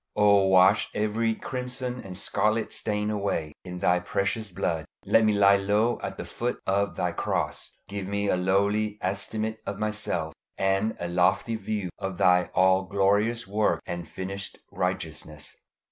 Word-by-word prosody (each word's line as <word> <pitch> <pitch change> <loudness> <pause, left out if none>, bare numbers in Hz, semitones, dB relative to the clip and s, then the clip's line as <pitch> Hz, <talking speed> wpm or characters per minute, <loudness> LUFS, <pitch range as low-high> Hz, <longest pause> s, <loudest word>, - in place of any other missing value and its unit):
O 100 -2 +5
wash 95 +3 +5
every 110 +2 0
crimson 125 0 -4
and 95 -2 -7
scarlet 110 +3 0
stain 105 0 -1
away 100 -7 -2
in 90 -1 -7
Thy 90 +1 +3
precious 100 +4 -2
blood. 85 -3 -1 0.2
Let 115 - +4
me 110 - +4
lie 100 -1 +5
low 105 +4 +1
at - - -5
the - - -5
foot 120 +1 -3
of 100 +1 +1
Thy 90 - 0
cross. - - -3
Give 100 -1 -5
me 100 +1 -1
a - - +3
lowly 100 +3 +1
estimate 110 +3 -2
of 100 - -3
myself, 105 -7 -2 0.2
and 95 +3 +1
a 85 - -3
lofty 90 +6 +2
view 105 -3 -3
of 95 -2 -4
Thy 90 +1 +4
all 95 +1 +4
glorious 105 +4 +2
work 105 +2 +1
and 85 -1 -5
finished 95 +1 -6
righteousness. 80 -4 -4
100 Hz, 155 wpm, -27 LUFS, 95-110 Hz, 0.2 s, O